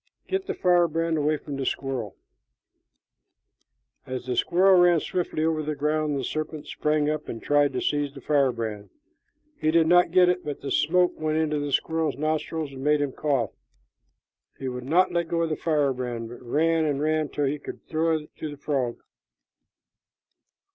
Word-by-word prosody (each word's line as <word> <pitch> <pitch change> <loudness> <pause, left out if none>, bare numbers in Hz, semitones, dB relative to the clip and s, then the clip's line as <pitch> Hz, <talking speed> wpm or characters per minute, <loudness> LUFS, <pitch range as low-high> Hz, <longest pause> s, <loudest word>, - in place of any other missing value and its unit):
Get 385 0 -2
the - - -2
firebrand 165 -2 +2
away 150 +1 +1
from 145 -1 -7
the 135 - -3
squirrel." 130 -7 -3 1.9
As 130 -1 -5
the 125 -1 -2
squirrel 185 +1 +4
ran 175 -2 +5
swiftly 160 -2 -2
over 160 -1 +1
the 150 0 -3
ground, 150 0 0
the 135 - -3
serpent 155 +2 -4
sprang 150 -1 0
up 155 0 -2
and 115 - -5
tried 145 +1 +2
to 125 - -2
seize 145 -1 0
the - - -11
firebrand. 115 -8 0 0.7
He 155 - +1
did 165 0 +4
not 175 +2 +5
get 180 -1 +5
it, 180 0 +1
but 145 -2 -5
the 140 - -5
smoke 180 +6 +2
went 155 0 0
into 155 -2 0
the 145 0 -3
squirrel's 160 -1 0
nostrils 155 0 -2
and 135 -1 -8
made 150 +1 +3
him 145 -2 -1
cough. 135 -7 -1 1.1
He 135 - -5
would 125 -1 -5
not 175 +7 +3
let 170 -1 0
go 170 0 0
of 165 - -1
the - - +1
firebrand, 130 -7 -1
but 120 - -10
ran 160 +6 +1
and 145 -3 0
ran 155 0 0
till 145 - -1
he 145 +2 -1
could - - -9
throw 160 0 +1
it 150 -1 -12
to 155 - -5
the 145 - -9
frog. 135 -4 -2
150 Hz, 180 wpm, -26 LUFS, 140-160 Hz, 1.9 s, ran